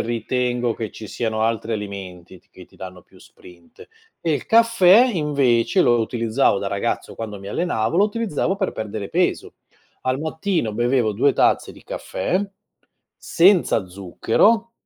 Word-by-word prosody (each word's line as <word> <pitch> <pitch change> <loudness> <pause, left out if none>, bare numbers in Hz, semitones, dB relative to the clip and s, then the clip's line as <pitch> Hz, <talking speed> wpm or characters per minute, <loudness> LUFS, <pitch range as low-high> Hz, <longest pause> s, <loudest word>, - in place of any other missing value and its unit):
ritengo 120 +1 -1
che 110 -1 -6
ci 110 - -10
siano 110 0 -2
altri 115 0 -1
alimenti 95 -3 -8
t - - -35
che - - -14
ti - - -26
danno 90 -1 -10
più - - -22
sprint 85 -1 -17 0.4
e 165 - 0
il 145 - -3
caffè, 230 0 +5
invece, 145 -1 +1
lo 120 -2 +3
utilizzavo 115 0 +1
da 100 - -3
ragazzo 100 0 -3
quando 105 -3 -7
mi 100 0 -9
allenavo, 115 - -1
lo 200 - +5
utilizzavo 205 -4 -2
per 195 -2 -2
perdere 105 -2 -5
peso. - - -1 0.5
Al 130 +1 -1
mattino 160 - -2
bevevo 120 0 +1
2 135 +7 +2
tazze - - +2
di - - -17
caffè 175 - -3 0.8
senza 170 - +2
zucchero, 115 - +1
120 Hz, 150 wpm, -21 LUFS, 105-165 Hz, 0.8 s, caffè